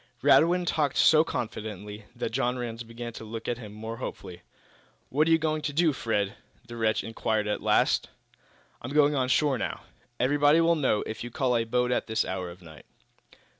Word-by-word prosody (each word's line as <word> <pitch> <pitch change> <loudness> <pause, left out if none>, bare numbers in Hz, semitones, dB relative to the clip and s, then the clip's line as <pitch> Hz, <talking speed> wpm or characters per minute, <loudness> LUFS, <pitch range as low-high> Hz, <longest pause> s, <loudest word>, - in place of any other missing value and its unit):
Radwin 175 +3 +5
talked 150 -5 0
so 155 0 +6
confidently 105 - -6
that - - -3
John 125 +1 0
Rhinds 120 -1 -5
began 115 0 -7
to 110 - -9
look 110 +1 -7
at 120 0 -2
him 105 -4 -9
more 110 +2 -7
hopefully. 90 -7 -7 0.7
"What 150 +5 +2
are - - +2
you 165 - +6
going 155 -1 -1
to 145 - -3
do, 160 0 +3
Fred?" 105 -5 -1 0.3
the 120 -1 -9
wretch 110 -2 0
inquired, 110 -1 -1
at 105 - -2
last. - - +2 0.7
"I'm 130 +4 -6
going 150 -1 +5
on 130 -3 +1
shore 140 -2 +2
now." - - -3 0.4
"Everybody 145 +4 +4
will 165 0 +4
know, 135 -9 +1
if 110 - -6
you 120 - -6
call 125 0 0
a 115 -1 +1
boat 125 +2 0
at - - 0
this 110 0 0
hour 95 -1 -4
of 85 - -11
the - - -16
night." 80 -1 -14
120 Hz, 200 wpm, -27 LUFS, 110-145 Hz, 0.7 s, so